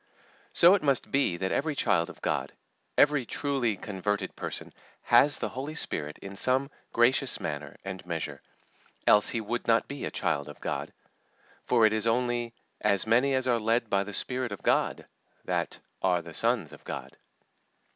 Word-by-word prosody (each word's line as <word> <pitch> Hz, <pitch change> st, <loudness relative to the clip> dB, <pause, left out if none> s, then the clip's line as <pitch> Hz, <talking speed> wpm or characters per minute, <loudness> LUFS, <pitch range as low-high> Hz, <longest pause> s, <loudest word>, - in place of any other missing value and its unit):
So 175 Hz, +2 st, +7 dB
it 200 Hz, -, +3 dB
must 140 Hz, -4 st, +1 dB
be 135 Hz, -11 st, +2 dB
that 95 Hz, +1 st, -2 dB
every 150 Hz, +1 st, 0 dB
child 95 Hz, -10 st, +2 dB
of -, -, -12 dB
God, -, -, -1 dB, 0.4 s
every 145 Hz, -2 st, +5 dB
truly 125 Hz, -4 st, -1 dB
converted 100 Hz, 0 st, -3 dB
person, -, -, -6 dB, 0.3 s
has 145 Hz, 0 st, +5 dB
the -, -, -3 dB
Holy 140 Hz, +4 st, -5 dB
Spirit 75 Hz, -, -3 dB
in 100 Hz, 0 st, -7 dB
some 130 Hz, +6 st, +2 dB, 0.2 s
gracious 125 Hz, +2 st, +3 dB
manner 75 Hz, -1 st, -5 dB
and 95 Hz, -1 st, -6 dB
measure, 80 Hz, -5 st, -4 dB, 0.6 s
else 105 Hz, 0 st, +5 dB
he 115 Hz, -, -1 dB
would 120 Hz, +3 st, -3 dB
not 115 Hz, 0 st, +3 dB
be 140 Hz, -1 st, -6 dB
a -, -, -2 dB
child 70 Hz, +1 st, -1 dB
of 75 Hz, -, -11 dB
God; -, -, -3 dB, 0.7 s
for 115 Hz, -3 st, +4 dB
it 110 Hz, -, +4 dB
is 110 Hz, +1 st, 0 dB
only 120 Hz, 0 st, 0 dB, 0.2 s
"as 100 Hz, -2 st, +2 dB
many 125 Hz, +5 st, +3 dB
as 130 Hz, 0 st, +1 dB
are 120 Hz, -2 st, +3 dB
led 115 Hz, +1 st, 0 dB
by 100 Hz, 0 st, +3 dB
the 105 Hz, -, -7 dB
Spirit 125 Hz, +3 st, -2 dB
of 100 Hz, -, -7 dB
God" -, -, +1 dB, 0.4 s
that -, -, -2 dB, 0.2 s
"are 90 Hz, -2 st, +2 dB
the 85 Hz, 0 st, -10 dB
sons -, -, 0 dB
of -, -, -14 dB
God." -, -, -7 dB
115 Hz, 175 wpm, -28 LUFS, 95-130 Hz, 0.7 s, So